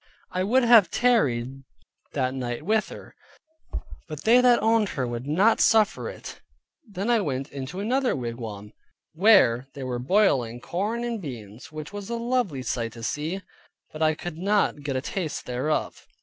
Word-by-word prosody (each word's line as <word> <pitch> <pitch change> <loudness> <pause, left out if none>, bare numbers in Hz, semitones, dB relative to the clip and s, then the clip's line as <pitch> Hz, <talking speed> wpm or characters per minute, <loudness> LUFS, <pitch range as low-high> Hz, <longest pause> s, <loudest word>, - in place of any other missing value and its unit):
I 185 0 -1
would 250 +6 +3
have 230 -5 +7
tarried 135 - +1 0.5
that 130 -2 0
night 125 0 -4
with 215 +2 +1
her, - - -11 0.9
but 155 -3 -7
they 240 +3 +6
that 245 -1 +5
owned 220 -2 +2
her 130 -4 -2
would 120 +2 -5
not 190 +10 +3
suffer 220 -1 +3
it. - - -10 0.5
Then 200 +4 -2
I 230 -2 +3
went 135 -5 -3
into 140 +6 -6
another 250 +5 +1
wigwam, 115 -4 -6 0.4
where 155 - +5
they 140 - -6
were 125 -1 -3
boiling 130 - +2
corn 205 - -3
and 235 -3 -3
beans, 115 - -9
which 155 +3 -8
was 205 0 -7
a 235 - -2
lovely 235 - -1
sight 115 -3 -3
to 115 -1 -10
see, 160 - -3 0.5
but 155 - -8
I 155 0 +3
could 165 0 -7
not 200 -5 +1
get 140 -2 -3
a 130 - 0
taste 165 +1 -4
thereof. 130 +5 -2
155 Hz, 165 wpm, -25 LUFS, 130-215 Hz, 0.9 s, have